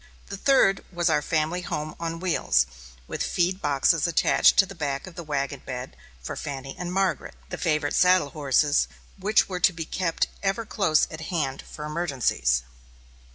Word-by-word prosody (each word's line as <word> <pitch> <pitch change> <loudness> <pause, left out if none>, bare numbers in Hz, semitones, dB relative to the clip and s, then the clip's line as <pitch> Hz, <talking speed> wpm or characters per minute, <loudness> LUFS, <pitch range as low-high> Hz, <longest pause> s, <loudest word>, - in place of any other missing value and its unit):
The 200 - -4
third 195 -5 +3
was 175 -1 +1
our 150 - +2
family 160 +3 -1
home 155 -3 -4
on 165 0 -4
wheels, 115 - +2 0.4
with - - -5
feed 185 +2 0
boxes 145 +2 +2
attached 170 - +4
to 195 - +7
the 195 - -10
back 140 -6 -3
of 185 - -10
the 170 - -7
wagon 140 -2 -3
bed 125 0 -6 0.3
for - - -5
Fanny 135 -2 -6
and 180 0 -5
Margaret, 190 -1 -1
the - - -5
favorite 150 -3 0
saddle 180 -5 +4
horses, 145 0 +2 0.3
which 210 +3 +3
were 185 -2 -4
to 180 - +5
be 165 -1 -5
kept 170 0 0 0.2
ever 200 +3 -1
close 190 -8 +2
at 160 0 -7
hand 140 -7 -2
for 150 - -9
emergencies. 130 - 0
165 Hz, 170 wpm, -25 LUFS, 145-180 Hz, 0.4 s, to